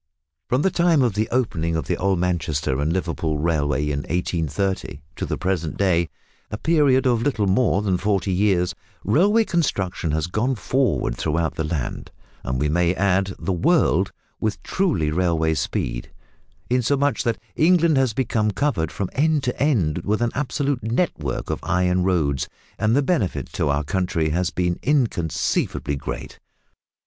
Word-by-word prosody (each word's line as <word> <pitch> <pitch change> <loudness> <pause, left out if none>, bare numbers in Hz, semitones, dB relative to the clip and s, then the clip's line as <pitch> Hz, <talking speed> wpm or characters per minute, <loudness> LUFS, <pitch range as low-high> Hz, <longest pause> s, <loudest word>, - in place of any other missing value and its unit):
From 125 +3 +2
the 190 - +2
time 170 -5 +3
of 120 -4 +1
the 110 +3 -1
opening 85 -10 0
of 80 - -2
the - - 0
old 95 0 +1
Manchester 80 -6 -1
and 75 +2 0
Liverpool 85 -3 -1
Railway 75 -3 0
in 75 -1 -1
1830 90 +2 -2 0.2
to - - -3
the - - -2
present 85 -4 -2
day 85 -4 +2 0.4
a 105 - -4
period 140 -3 +3
of 120 -3 +2
little 115 -5 +1
more 100 +1 +2
than 95 -3 +1
forty 100 -2 0
years 95 -1 +2 0.3
railway 200 - +4
construction 100 - -1
has 80 0 0
gone 115 +9 0
forward 130 - 0
throughout 80 0 0
the 80 - -2
land 75 -4 -3 0.3
and 65 0 -2
we 75 - +1
may 85 +3 +2
add 95 0 +1
the 95 - -2
world 85 - +2 0.3
with 110 -1 -2
truly 145 - 0
railway 80 -2 +1
speed, - - -2 0.6
insomuch 135 +4 +1
that 115 -2 -1 0.2
England 170 -1 +4
has 130 -4 +2
become 115 -4 +1
covered 105 - 0
from 100 +1 -3
end 150 0 +2
to 125 - -2
end 100 - +2
with 105 +6 0
an 120 - 0
absolute 140 0 -1
network 110 - -1
of - - -2
iron 90 +2 +1
roads, 75 -8 0 0.3
and 110 +2 +2
the 140 - +3
benefit 135 - -1
to - - 0
our 70 +1 +1
country 85 0 0
has 90 +3 0
been 90 -3 -1
inconceivably 110 - 0
great. 70 - -6
95 Hz, 160 wpm, -22 LUFS, 80-125 Hz, 0.6 s, railway